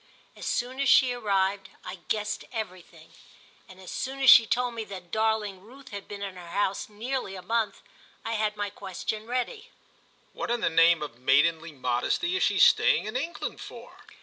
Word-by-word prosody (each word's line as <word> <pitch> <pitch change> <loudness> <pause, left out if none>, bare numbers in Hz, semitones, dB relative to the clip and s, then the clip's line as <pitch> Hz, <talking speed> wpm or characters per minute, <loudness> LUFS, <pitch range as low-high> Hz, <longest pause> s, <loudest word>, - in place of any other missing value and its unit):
As - - -7
soon 255 +2 -2
as 275 -1 +2
she 255 -2 +6
arrived 195 -4 0 0.2
I 185 0 -7
guessed 210 -1 -2
everything, 185 -7 -8 0.6
and 190 0 -14
as 185 - -10
soon 265 +1 -4
as 270 -1 +8
she 230 - +8
told 245 +1 0
me 230 -1 -4
that 185 -4 -10
darling 220 -3 0
Ruth 260 +6 -15
had 200 -1 -8
been 200 -1 -7
in 195 -2 -6
her 175 -1 -10
house 195 +4 -1
nearly 220 -1 -4
a 185 - -9
month 225 0 -1 0.4
I - - -2
had 215 -1 -1
my 205 -1 -3
question 205 +3 -5
ready. 255 - -3 0.6
"What - - -5
in 240 -1 0
the - - +1
name 165 -1 +5
of 120 -5 -8
maidenly 160 +6 +2
modesty 130 - -1
is 385 - 0
she - - +2
staying - - +5
in 215 - -6
England 310 +7 -4
for?" - - -11
210 Hz, 185 wpm, -27 LUFS, 185-245 Hz, 0.6 s, as